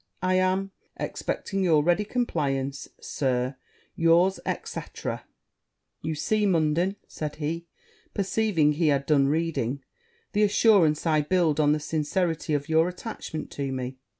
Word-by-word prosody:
I 185 0 +2
am, 185 +1 +1 0.3
expecting 195 -1 -3
your 160 -5 +4
ready 175 +6 +2
compliance, 140 - -1
Sir, 130 -1 -1 0.4
yours, 170 +3 +4 0.3
&c. - - -4 0.6
.' - - -55
'You 160 0 -2
see, 215 +7 +1
Munden,' 170 +2 +2
said 150 -1 -5
he, 165 +3 -4 0.5
perceiving 195 -6 +2
he 155 +2 +1
had 140 -2 +2
done 140 -2 +3
reading, 140 -4 -1 0.5
'the 210 - +2
assurance 200 -7 +4
I 155 -2 +3
build 160 -1 +1
on 150 -1 +4
the 150 - 0
sincerity 160 +1 -1
of 145 0 -2
your 160 +1 +3
attachment 180 -4 -6
to 140 -1 -3
me.' 130 0 -4
160 Hz, 135 wpm, -26 LUFS, 145-185 Hz, 0.6 s, your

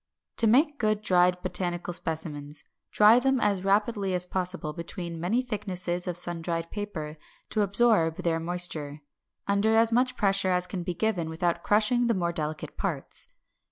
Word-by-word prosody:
To 230 - +5
make 285 +6 +3
good 215 -1 0
dried 180 -2 +3
botanical 175 -1 -1
specimens, 150 -3 -3 0.3
dry 215 +3 +6
them 265 0 +1
as 200 -4 +1
rapidly 200 -1 +1
as 180 0 +2
possible 180 -3 -3
between 170 +1 -6
many 210 +10 0
thicknesses 185 -6 -3
of 175 -1 -1
sun 175 -1 -3
dried 165 0 -3
paper 160 -8 -5 0.3
to 215 - +1
absorb 200 -5 +3
their 165 -1 +1
moisture, 165 -4 -2 0.5
under 200 +2 +2
as 225 0 +4
much 250 +2 +1
pressure 195 -2 +2
as 180 0 +2
can 180 0 -5
be 175 0 -4
given 180 -5 -1
without 170 +1 -1
crushing 220 +5 +2
the 230 - +2
more 170 -2 0
delicate 155 -1 -5
parts. - - -3
180 Hz, 160 wpm, -27 LUFS, 170-215 Hz, 0.5 s, dry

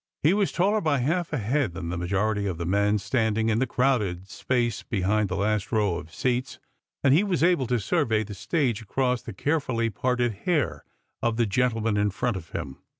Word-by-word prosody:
He 155 +5 +5
was 200 -1 +1
taller 205 +4 +2
by 155 -3 +2
half 165 +7 0
a 150 - 0
liead 120 - 0
than 85 -2 -5
the 85 - -2
majority 100 +4 0
of 90 -4 -3
the 85 - -4
men 100 +3 +2
standing 110 +1 0
in 110 0 +2
the 130 - +1
crowded 110 -9 0
Bfiace 120 +2 -1
behind 105 0 +1
the 95 - -2
lust 105 +1 0
row 105 -6 +1
of 80 - -9
seats, 125 +6 -1 0.5
and 135 -1 +5
he 170 +7 +5
was 185 -5 0
able 170 -8 +3
to 125 0 +1
survey 110 - +1
the 105 0 -8
stage 125 - -1
across 125 +2 0
the - - -8
carefully 125 -1 -1
parted 125 -1 0
hair 135 - -1 0.4
of 115 -1 0
the 120 - +3
gentleman 115 -1 +1
in 105 0 +2
fro'it 120 +3 -1
of 85 -3 -7
him. 65 -1 -5
115 Hz, 205 wpm, -26 LUFS, 100-130 Hz, 0.5 s, He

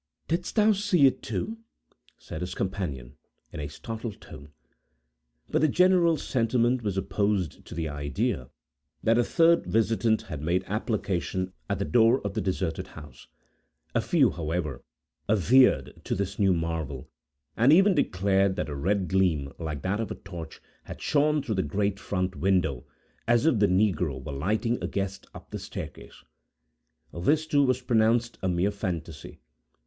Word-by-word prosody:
"Didst 175 +2 -2
thou 215 -1 +5
see 200 -7 +3
it, 135 - +3
too?" 225 +1 -4 0.6
said 80 - -8
his 90 - -4
companion, 75 -11 -4 0.4
in - - -6
a 75 - -3
startled 110 +8 -7
tone. 70 +2 -12 1.0
But - - +2
the 155 - +5
general 175 +1 +4
sentiment 120 0 +1
was 100 -4 -2
opposed 95 -2 -1
to - - -9
the 80 -1 -2
idea, 75 - -2 0.5
that 115 +2 +3
a - - +4
third 170 +5 +3
visitant 110 0 +1
had 75 - -7
made 85 +4 0
application 95 -4 -2 0.2
at 100 - 0
the 100 - -2
door 120 +2 +4
of 100 - -2
the 110 - -1
deserted 95 -4 -2
house. 70 -4 -13 0.7
A - - +2
few, - - +3
however, 75 -5 -3 0.5
adhered 115 +6 +4
to - - -1
this 100 +1 -3
new 95 -3 +4
marvel, 80 -5 -3 0.5
and 120 +5 +4
even 190 +5 +6
declared 95 - +2
that 95 - -3
a 75 - -4
red 95 +6 0
gleam, 85 -8 +1
like 75 -4 -5
that 100 +3 -1
of 115 -4 -2
a - - -4
torch, 85 -4 -9 0.3
had - - -8
shone 150 0 +2
through 115 - -2
the 95 - +1
great 100 +6 -1
front 90 -1 -2
window, 90 -9 0 0.4
as 120 +3 +3
if 140 -9 +3
the 105 - +4
negro 90 -7 +1
were 65 - -7
lighting 110 - 0
a - - -1
guest 100 0 -4
up - - -12
the - - -4
staircase. - - -9 0.9
This, 150 - +1
too, 145 -2 +2
was 130 -1 +1
pronounced 115 0 +2
a 95 - 0
mere 90 +3 +1
fantasy. 85 -6 -5
100 Hz, 160 wpm, -27 LUFS, 85-120 Hz, 1.0 s, even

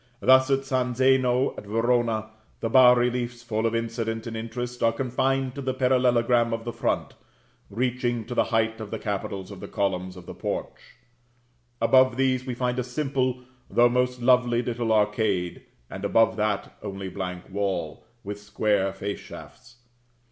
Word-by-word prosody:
Thus 130 +1 +5
at 135 0 +1
San 125 -2 -1
Zeno 130 0 +3
at 105 - -12
Verona, 115 -1 0 0.3
the 115 - -2
bas 125 -1 +7
reliefs, 120 0 -1
full 115 -1 -1
of 115 - -2
incident 115 -1 -3
and 115 -1 -5
interest 120 +2 -5
are 115 - +4
confined 130 +2 -1
to 135 -1 -4
a 130 - -1
parallelogram 125 -2 +2
of 115 0 -3
the 120 0 -5
front, - - -1 0.6
reaching 120 +1 -1
to 120 - -6
the - - +2
height 115 -1 0
of 110 - -6
the - - -3
capitals 100 -1 -4
of 100 - -9
the - - -7
columns 95 -2 -2
of 90 - -11
the - - -8
porch. - - -6 0.8
Above 130 +1 +4
these, 130 -1 +1
we 125 - -3
find 125 0 -1
a - - 0
simple 130 -1 -1 0.3
though 120 0 +4
most 125 0 0
lovely, 125 -1 +3
little 120 -1 -2
arcade; 105 -4 0 0.2
and 95 +9 -8
above 115 +2 +3
that, 105 -2 -2
only 100 -2 -6
blank 90 -1 -6
wall, 95 -6 -2 0.2
with 100 +1 -6
square 100 -1 0
face 100 +1 -4
shafts. 120 0 -13
120 Hz, 165 wpm, -25 LUFS, 105-125 Hz, 0.8 s, bas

